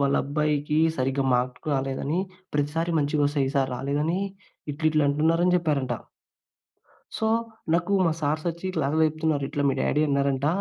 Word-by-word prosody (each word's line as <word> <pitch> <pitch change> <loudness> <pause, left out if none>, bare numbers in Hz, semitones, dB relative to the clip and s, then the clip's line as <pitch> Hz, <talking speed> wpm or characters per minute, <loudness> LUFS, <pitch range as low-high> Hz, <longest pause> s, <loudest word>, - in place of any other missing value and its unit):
వాళ్ళ 140 0 +2
అబ్బాయికి 150 +1 0 0.2
సరిగ్గా 135 +1 0
మార్కులు 125 +4 -1
రాలేదని 135 +4 -1 0.4
ప్రతిసారి 155 +4 0
మంచిగా 145 0 +1
వస్తాయి. 140 -2 0
ఈసారి 135 -2 +1
రాలేదని 150 +7 -1 0.5
ఇట్లా, 155 +2 -2
ఇట్లా" 155 -1 +2
అంటున్నారని 165 +4 +2
చెప్పారంట. 145 -7 0 1.3
సో, 220 - 0 0.5
నాకు 175 +4 +1
మా - - +3
సార్సొచ్చి 155 +4 -1
ఇట్లాని 155 -2 0
చెప్తున్నారు. 155 -2 -1
"ఇట్లా 145 -2 -2
మీ 135 - +2
డ్యాడీ 150 - +2
అన్నారంట. 140 0 +1
145 Hz, 135 wpm, -25 LUFS, 140-160 Hz, 1.3 s, మా